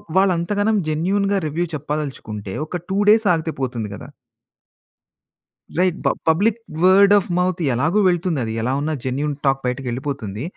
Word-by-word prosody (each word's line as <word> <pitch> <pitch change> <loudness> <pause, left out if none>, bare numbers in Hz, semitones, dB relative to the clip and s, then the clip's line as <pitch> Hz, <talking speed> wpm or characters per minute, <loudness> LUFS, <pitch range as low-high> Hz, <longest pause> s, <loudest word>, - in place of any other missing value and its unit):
వాళ్ళు 190 0 +4
అంతగనం 205 +5 0
జెన్యూన్‌గా 195 +6 +1
రివ్యూ 165 +4 -1
చెప్పదలుచుకుంటే 140 -9 -5
ఒక 175 +2 -5
2 190 - -1
డేస్ 220 +1 +5
ఆగితే 160 -1 -1
పోతుంది 120 -5 -3
కదా! - - -10 1.7
రైట్ 180 -1 +2
బ - - +4 0.2
పబ్లిక్ 205 +8 +2 0.2
వర్డ్ 195 +2 +6
ఆఫ్ 200 - 0
మౌత్ 180 -1 0
ఎలాగు 160 - +1
వెళ్తుంది. 175 -3 0
అది 110 - -4
ఎలా 120 +3 -1
ఉన్నా 155 +1 -1
జెన్యూన్ 140 +3 -1
టాక్ 135 0 +2
బయటకి 125 +2 -2
వెళ్ళిపోతుంది. 125 -4 -4
160 Hz, 150 wpm, -21 LUFS, 135-190 Hz, 1.7 s, వర్డ్